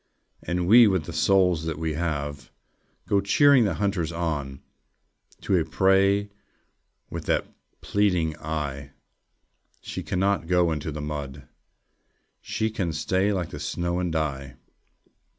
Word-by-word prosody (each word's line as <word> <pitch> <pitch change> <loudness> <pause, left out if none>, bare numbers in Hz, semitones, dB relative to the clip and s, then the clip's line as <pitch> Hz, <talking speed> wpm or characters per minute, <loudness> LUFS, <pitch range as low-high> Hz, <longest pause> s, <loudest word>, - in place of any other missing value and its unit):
And 90 0 -2
we, 115 +3 +8
with 95 -5 +1
the - - -8
souls 90 -4 +2
that 80 -2 -3
we 80 0 -2
have, 75 -3 -3 0.6
Go 100 -1 +2
cheering 130 +5 +5
the 100 - -1
hunters 95 -5 -1
on 75 -6 -3 0.8
To 95 - +1
a 85 - +3
prey 95 +4 +2 0.8
with - - -6
that - - +1 0.4
pleading 90 -6 +1
eye. 70 -3 -5 0.9
She - - -6
cannot 95 -2 0
go 90 -1 +3
into 80 0 -3
the 75 0 -6
mud! 70 -2 -6 0.9
She 110 0 -2
can 95 -7 -2
stay 95 +6 0
like 90 -4 -2
the 75 - -7
snow, 85 +4 -2
and 90 -2 -1
die! 70 -5 -3
85 Hz, 135 wpm, -25 LUFS, 75-95 Hz, 0.9 s, we